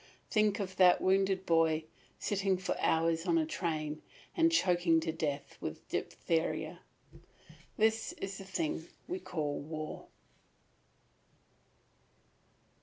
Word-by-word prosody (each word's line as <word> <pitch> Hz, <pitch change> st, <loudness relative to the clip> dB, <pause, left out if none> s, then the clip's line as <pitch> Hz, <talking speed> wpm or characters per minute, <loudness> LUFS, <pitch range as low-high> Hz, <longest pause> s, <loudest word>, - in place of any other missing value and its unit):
Think 215 Hz, -1 st, +3 dB
of 190 Hz, -2 st, -4 dB
that 180 Hz, -1 st, +7 dB
wounded 190 Hz, 0 st, +2 dB
boy, 165 Hz, -1 st, +3 dB, 0.3 s
sitting 195 Hz, -2 st, 0 dB
for 185 Hz, -, -2 dB
hours 165 Hz, +1 st, +2 dB
in 170 Hz, -1 st, +4 dB
a 160 Hz, -, +2 dB
train, 155 Hz, -2 st, -2 dB, 0.3 s
and 330 Hz, -1 st, +4 dB
choking 175 Hz, -, +3 dB
to 160 Hz, 0 st, -1 dB
death 150 Hz, -3 st, -3 dB
with -, -, -6 dB
diphtheria. 165 Hz, -1 st, -1 dB, 1.0 s
This 220 Hz, 0 st, +2 dB
is 195 Hz, 0 st, -6 dB
the -, -, -7 dB
thing 165 Hz, -3 st, -2 dB, 0.2 s
we 365 Hz, +2 st, -3 dB
call 150 Hz, -, -3 dB
war. 155 Hz, +1 st, -6 dB
175 Hz, 110 wpm, -33 LUFS, 160-195 Hz, 1.0 s, that